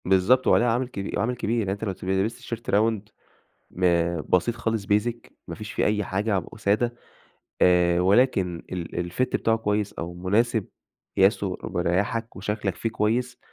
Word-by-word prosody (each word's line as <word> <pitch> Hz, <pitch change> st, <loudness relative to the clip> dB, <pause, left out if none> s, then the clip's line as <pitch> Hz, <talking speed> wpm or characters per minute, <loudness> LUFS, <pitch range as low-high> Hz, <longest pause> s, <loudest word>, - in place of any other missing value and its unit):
بالضبط. 95 Hz, +8 st, +3 dB
وعليها 120 Hz, -, +4 dB
عامل 125 Hz, +2 st, 0 dB
كبي 100 Hz, -6 st, -5 dB
عامل 115 Hz, +4 st, 0 dB
كبير. 120 Hz, -1 st, -1 dB
يعني 100 Hz, -4 st, -1 dB
أنت 100 Hz, +2 st, -5 dB
لو 105 Hz, -, -1 dB
ت 95 Hz, -, -11 dB
لِبست 95 Hz, +4 st, 0 dB
تيشرت 115 Hz, 0 st, -6 dB
round 110 Hz, +2 st, +3 dB, 0.7 s
م 85 Hz, -2 st, +1 dB
بسيط 90 Hz, +9 st, +1 dB
خالص 115 Hz, -3 st, -2 dB
basic، 115 Hz, +4 st, 0 dB, 0.2 s
ما -, -, -6 dB
فيش 105 Hz, -2 st, -7 dB
فيه -, -, 0 dB
أي 105 Hz, 0 st, +1 dB
حاجة 100 Hz, +3 st, -1 dB
ع 95 Hz, -, +1 dB
وسادة، 110 Hz, +3 st, 0 dB, 0.7 s
آآ 90 Hz, -1 st, +4 dB
ولكن 95 Hz, -3 st, +2 dB
ال 85 Hz, 0 st, -4 dB
الfit 125 Hz, -, 0 dB
بتاعه 115 Hz, -3 st, +1 dB
كويس 105 Hz, -2 st, -1 dB
أو 85 Hz, +1 st, -6 dB
مناسب 105 Hz, +4 st, +1 dB, 0.5 s
قياسه 95 Hz, -1 st, +3 dB
مريّحك 95 Hz, +6 st, -1 dB
وشكلك 105 Hz, 0 st, -2 dB
فيه 115 Hz, -, -3 dB
كويس، 120 Hz, +3 st, -1 dB
105 Hz, 165 wpm, -25 LUFS, 95-115 Hz, 0.7 s, وعليها